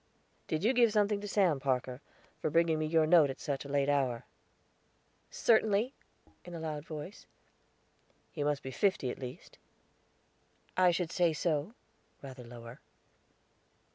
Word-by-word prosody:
"Did 155 +2 -2
you 235 +5 +3
give 235 -3 +4
something 210 -1 +1
to 205 - -6
Sam, 185 -8 +2
Parker, 130 -1 -2 0.4
for - - -1
bringing 165 0 +2
me 155 - -1
your 160 0 +3
note 160 -3 +5
at 135 - -6
such 140 -1 -3
a - - -8
late 140 0 +1
hour?" 130 -4 0 1.0
"Certainly," 220 +2 +2 0.5
in 175 -1 -9
a - - -5
loud 155 -2 -4
voice. 155 +5 -9 1.0
"He 150 - -3
must 145 -1 -1
be 130 - -6
fifty, 190 -7 0
at - - -9
least." 125 -2 -9 1.2
"I 185 -1 +5
should 175 -1 -1
say 175 -3 +2
so," 155 +6 -1 0.5
rather 130 -2 -9
lower. 115 +1 -11
155 Hz, 145 wpm, -32 LUFS, 140-185 Hz, 1.2 s, note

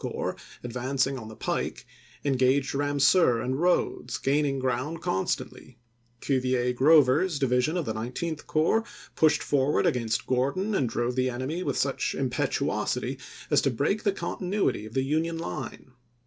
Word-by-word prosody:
xiii. - - -2
Corps, - - -3 0.3
advancing 130 +2 -1
on 110 - -9
the 110 - -10
pike, - - -3 0.4
engaged 135 0 +2
Ramseur 145 -1 +3
and 130 +3 -2
Rodes, 180 0 +1
gaining 140 0 +1
ground 130 +5 -2
constantly; 115 +4 -3 0.4
Cuvier 125 -2 +1
Grover's 150 +4 +4
division 130 +4 +1
of 170 - -1
the 110 - -2
Nineteenth 130 +8 -4
Corps 165 +9 +2 0.3
pushed 155 -1 +3
ww. - - -6
' - - -13
forward 140 0 +2
against 115 -3 0
Gordon 140 +12 0
and 135 - +1
drove 120 +2 -1
the 130 0 +1
enemy 130 +8 -3
with - - -2
such - - 0
impetuousity - - -1 0.3
as - - +5
to - - +2
break 210 +1 0
the 200 - +2
continuity 190 - -2
of 110 - -13
the 130 - +2
Union 160 +4 0
line. 165 -5 -6
135 Hz, 155 wpm, -27 LUFS, 125-160 Hz, 0.4 s, as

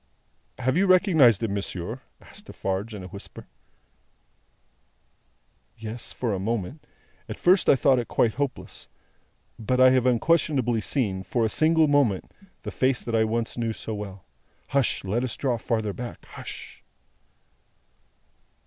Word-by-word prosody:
"Have 130 +4 0
you 195 +2 +3
recognised 160 - +5
him, 105 -3 -1
monsieur?" 100 +4 -4 0.2
asked 210 - -11
Defarge 100 - -4
in 100 - -7
a - - -7
whisper. 100 +2 -10 2.3
"Yes; 115 +1 -6
for 120 -4 -2
a 95 - -2
moment. 115 - -3 0.4
At - - -5
first 185 +2 +4
I - - +7
thought 130 -1 +3
it 120 - -4
quite 115 -3 +2
hopeless, 140 -1 -4 0.7
but 125 +3 0
I 130 0 +7
have 130 -1 +3
unquestionably 125 -3 +2
seen, 105 -7 -1
for 115 +5 0
a - - +1
single 160 +4 +3
moment, 140 -10 +2 0.3
the - - -5
face 130 -1 +1
that 115 - -5
I 110 -1 +3
once 115 +2 -2
knew 115 -1 -1
so 110 - -6
well. 100 -3 -7 0.4
Hush! 140 -3 +1
Let 105 +6 -1
us 125 -5 -4
draw 125 -4 0
further 110 -3 -1
back. 120 +2 -8
Hush!" - - -10
120 Hz, 145 wpm, -25 LUFS, 110-135 Hz, 2.3 s, I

